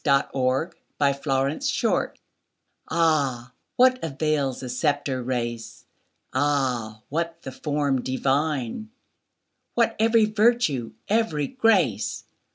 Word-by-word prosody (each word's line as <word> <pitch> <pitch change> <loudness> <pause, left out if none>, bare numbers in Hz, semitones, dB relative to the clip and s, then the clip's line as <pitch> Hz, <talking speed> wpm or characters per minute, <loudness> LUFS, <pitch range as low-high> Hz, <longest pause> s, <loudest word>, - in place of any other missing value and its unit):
Rose 140 -2 +2 0.7
Aylmer 140 0 +1 1.3
AH, 140 -7 +1 0.2
what 255 0 +4
avails 150 -3 -1
the 130 - -5
sceptred 130 -1 -1
race! 120 -2 -4 0.5
Ah, 130 -6 0
what 165 +2 -2
the 135 - -6
form 145 -1 -1
divine! 135 - -1 0.9
What 230 -1 +2
every 225 0 +4
virtue, 215 - +1
every 205 -9 +1
grace! 195 - +1
145 Hz, 85 wpm, -25 LUFS, 130-170 Hz, 1.3 s, what